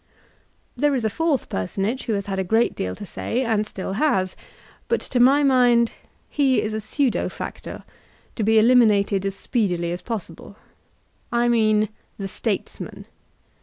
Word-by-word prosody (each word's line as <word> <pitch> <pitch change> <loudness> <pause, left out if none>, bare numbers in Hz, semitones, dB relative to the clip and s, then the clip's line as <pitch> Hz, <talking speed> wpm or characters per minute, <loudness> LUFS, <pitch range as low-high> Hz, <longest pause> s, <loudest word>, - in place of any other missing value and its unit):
There 290 -1 +2
is 240 -4 -1
a 220 - +1
fourth 325 +1 0
personage 195 - -2
who 225 - -1
has 200 -1 -2
had 195 -1 -3
a - - +1
great 225 +6 +2
deal 90 0 -3
to - - -8
say, 240 +6 -2
and 220 -3 0
still 190 -2 -5
has; 190 -12 +1 0.5
but 470 - +1
to 250 - -2
my 275 +4 +5
mind 245 -4 +4 0.3
he 275 -3 +2
is 215 - -2
a 220 - -2
pseudo 250 +4 0
factor, - - -7 0.5
to - - -3
be 220 +1 +3
eliminated 215 -4 +4
as 195 - -4
speedily 180 -7 -1
as 175 - -4
possible. 200 -5 -6 0.8
I 240 0 +2
mean 215 -2 +3 0.3
the 195 - -4
"Statesman.'' 200 +1 -4
220 Hz, 160 wpm, -23 LUFS, 195-245 Hz, 0.8 s, my